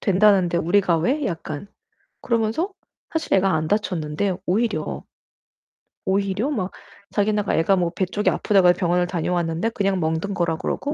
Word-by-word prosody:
된다는데 190 -3 +3
우리가 175 0 +2
왜?" 275 - 0
약간 165 -1 -5 0.5
그러면서 235 - 0 0.4
사실 320 -1 -1
애가 195 0 +3
안 160 0 0
다쳤는데 180 -2 -1
오히려 200 -4 -1 1.0
오히려 200 +6 0
막 195 -9 -2 0.4
자기네가 210 0 +1
"애가 165 +4 +3
뭐 175 -2 +1
배 180 +2 -1
쪽이 205 +3 0
아프다고 195 -3 +3
해 175 - +7
병원을 180 -1 +1
다녀왔는데 175 +2 -1
그냥 195 -4 0
멍든 160 +4 -1
거라 170 -3 0
그러고 285 - -3
190 Hz, 340 characters per minute, -23 LUFS, 170-210 Hz, 1.0 s, 해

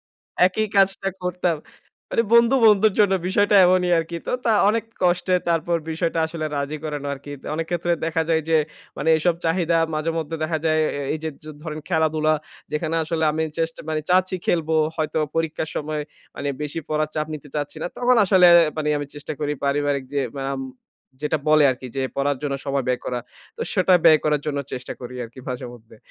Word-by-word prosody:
একদমই - - - 0.3
একই 215 +4 0
কাজটা 195 0 +3
করতাম। 180 -2 -1 0.5
মানে 230 - +2
বন্ধু 235 +3 +6
বন্ধুর 210 0 +5
জন্য 205 -2 +4 0.2
বিষয়টা 205 +1 +3
এমনই 180 -1 +3
আরকি। 165 +1 -3
তো, - - -2
তা 225 - +4 0.2
অনেক 225 0 -1 0.2
কষ্টে 180 +1 +2
তারপর 170 +1 +1
বিষয়টা 165 0 -1
আসলে 160 -1 -4
রাজি 140 +2 -2
করানো 145 -2 -4
আরকি। 140 +1 -10 0.2
অনেক 165 +1 -2
ক্ষেত্রে 175 0 0
দেখা 165 0 0
যায় 160 -1 +2
যে, 160 - +5 0.4
মানে 160 - -2
এসব 170 +2 +2
চাহিদা 165 0 +2 0.2
মাঝেমধ্যে 160 0 -2
দেখা 160 0 -1
যায়। 155 0 +3 0.3
এই - - -4
যে, 160 - -1 0.3
ধরেন 155 -2 -5
খেলাধুলা, 155 -2 +2 0.4
যেখানে 160 +1 -1
আসলে 160 0 -1
আমি 160 +1 0
চেষ্ট 165 0 -1
মানে 155 - 0
চাচ্ছি 185 +1 +3
খেলবো। 160 -2 +1 0.2
হয়তো 155 -1 -1 0.2
পরীক্ষার 160 -1 -1
সময় 150 0 -2 0.3
মানে 145 - -3
বেশি 150 +2 -4
পড়ার 155 0 0
চাপ 155 0 -1
নিতে 145 -1 -9
চাচ্ছি 145 +1 -3
না। - - -1
তখন 250 0 +3
আসলে 185 -2 +6 0.3
মানে 150 -1 -1
আমি 145 - -4
চেষ্টা 145 +1 -6
করি 150 0 0
পারিবারিক 140 -1 0
যে 140 - +2 0.3
আম 135 - -4 0.6
যেটা 150 +1 0
বলে 155 -1 +6
আরকি, 130 0 -5
যে 135 - 0
পড়ার 140 -1 0
জন্য 140 -2 -1
সময় 140 -1 0
ব্যয় 125 - 0
করা। 125 -1 -2 0.4
তো - - -10
সেটা 185 -1 +4
ব্যয় 155 - +8
করার 150 -1 +2
জন্য 145 -2 -1
চেষ্টা 125 0 -5
করি 125 0 -8
আরকি 120 +3 -12
মাঝে 125 -1 -4
মধ্যে। 115 -1 -17
160 Hz, 185 wpm, -23 LUFS, 150-175 Hz, 0.6 s, ব্যয়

